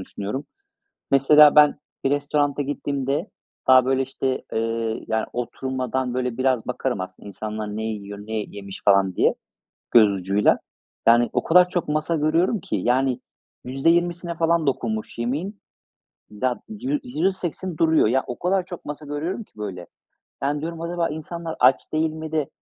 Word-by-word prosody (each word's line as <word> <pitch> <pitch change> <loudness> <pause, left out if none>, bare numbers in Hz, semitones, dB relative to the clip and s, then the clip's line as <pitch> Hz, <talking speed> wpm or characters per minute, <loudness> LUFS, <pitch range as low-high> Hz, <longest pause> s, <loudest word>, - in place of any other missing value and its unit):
düşünüyorum. 100 +8 -5 0.7
Mesela, 150 +2 +7
ben 150 -1 +6 0.3
bir 135 - +2
restorana 145 0 +1
gittiğimde 140 +3 -2 0.4
daha, 130 -1 +7
böyle, 135 0 +2
işte, 130 0 -2
ııı, 115 0 -1
yani, 110 0 0
oturmadan, 130 0 -2
böyle, 125 -1 -2
biraz 130 -3 +1
bakarım 125 -4 -2
aslında 95 +2 -9
insanlar 105 +1 -5
ne 110 - -3
yiyor, 100 -2 -5
ne 110 +2 -8
yemiş 100 -1 -9
falan 100 -2 +4
diye - - +3 0.6
göz 110 -4 +6
ucuyla. 100 +2 +2 0.5
Yani, 120 +1 +5
o - - +1
kadar 180 +2 +6
çok 175 -3 -2
masa 155 +2 0
görüyorum 165 +7 +2
ki, 105 - -3
yani, 125 +5 +1 0.4
%20'sine 170 +6 +1
falan 165 -1 +1
dokunmuş 110 -5 -2
yemeğin, 155 - -3 0.7
da 120 +4 -2
yü 255 +7 -2
yüzde 195 -6 +1
sekseni 180 -2 -5
duruyor. 160 -6 +4
Ya, 130 +3 +1
o 125 - -6
kadar 185 +1 +1
çok 175 -3 -9
masa 150 0 -7
görüyorum 165 +9 -3
ki - - -34
böyle. 95 -4 -6 0.6
Yani, 145 +1 0
diyorum: 165 +1 -5
"Acaba 170 0 -1
insanlar 160 +2 -6
aç 125 +1 +3
değil 155 0 +1
mi 160 0 -7
de 155 -3 -1
135 Hz, 155 wpm, -23 LUFS, 115-160 Hz, 0.7 s, Mesela